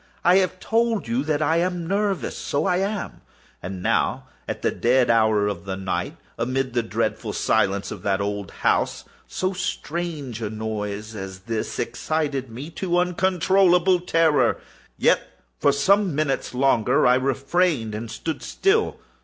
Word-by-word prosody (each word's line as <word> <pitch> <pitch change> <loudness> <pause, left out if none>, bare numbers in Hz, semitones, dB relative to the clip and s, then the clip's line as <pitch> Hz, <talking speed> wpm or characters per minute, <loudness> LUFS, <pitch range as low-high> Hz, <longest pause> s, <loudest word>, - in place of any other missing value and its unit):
I 180 +2 +6
have 185 -1 +1
told 225 - 0
you 120 +4 0
that 155 0 +1
I 160 +2 +2
am 175 0 -1
nervous: 195 - -1
so 145 - -2
I 180 -2 +2
am. 200 +2 -3 0.4
And 90 0 -6
now - - +1 0.2
at - - -5
the - - +2
dead 125 0 +3
hour 110 -2 +3
of 100 -1 -4
the 95 -1 -4
night, 95 -1 -3 0.2
amid 130 +1 -1
the 120 - +2
dreadful 115 - -2
silence 100 0 +1
of 100 - -7
that 95 0 0
old 100 -2 -3 0.2
house, - - +1 0.2
so 185 +1 -2
strange 160 - -4
a 110 - -2
noise 110 0 -4
as 95 -2 -7
this 110 +2 -3
excited 145 -5 -2
me 130 +8 -8
to 175 +1 -1
uncontrollable 180 0 +3
terror. 165 -3 +2 0.4
Yet, - - +4 0.4
for - - +4
some 185 +5 +2
minutes 140 -4 -1
longer 130 +1 +3
I 125 - +6
refrained 135 -1 +1
and 110 +2 -5
stood 155 +8 -4
still. 425 +3 +1
140 Hz, 155 wpm, -23 LUFS, 110-180 Hz, 0.4 s, I